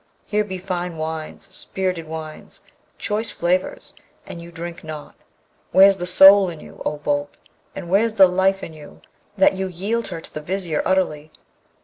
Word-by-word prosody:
Here 210 0 0
be 190 -2 -6
fine 180 -2 -4
wines, 160 +4 -5
spirited 185 -4 -3
wines! 155 -1 -8 0.3
choice 215 +1 -2
flavours! 180 -1 -2 0.3
and 170 - -9
you 170 0 -11
drink 170 0 -7
not! 155 -2 -8 0.6
Where's 195 +1 +7
the 175 -1 -4
soul 195 +1 +8
in 165 -3 -8
you, - - -14
O 150 - -2
Boolp, 145 0 -2 0.4
and 190 -3 -7
where's 210 +5 +2
the 195 -3 +7
life 190 +1 +1
in 165 - -7
you, 150 -2 -14 0.4
that 190 - +5
you 190 0 -3
yield 200 +6 -2
her 170 -3 -6
to - - -11
the 155 - -5
Vizier 175 -1 -2
utterly? 155 -5 0
180 Hz, 165 wpm, -21 LUFS, 160-195 Hz, 0.6 s, soul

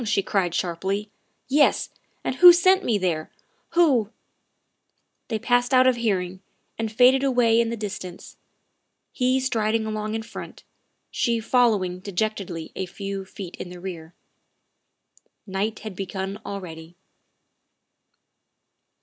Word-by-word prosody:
she 210 -3 +1
cried 180 -4 0
sharply; 190 +4 -2 0.2
" - - -46
yes, 285 +3 +3 0.3
and 260 - -2
who 355 0 +11
sent 375 +2 +4
me 225 - +1
there, 170 -5 -1 0.4
who 275 -12 +3 0.6
" - - -50
They 225 - -1
passed 245 +3 +2
out 255 0 +6
of 255 -1 +4
hearing 190 -5 -1 0.3
and 225 -1 -3
faded 255 +4 +5
away 240 -4 +3
in 230 - -1
the 235 - -3
distance, 190 -4 -7 0.8
he 255 0 +1
striding 225 -4 0
along 215 0 -3
in 225 - -3
front, 230 - -10 0.5
she 235 -1 0
following 215 -6 +2
de 200 +1 -8
jectedly 185 -5 -3
a 190 - -3
few 195 +1 -5
feet 190 -2 -9
in 175 - -7
the 180 0 -10
rear. 175 -2 -8 1.3
Night 205 +3 -2
had 215 -3 -7
begun 195 +2 -5
already. 170 -4 -8
215 Hz, 130 wpm, -24 LUFS, 190-240 Hz, 1.3 s, who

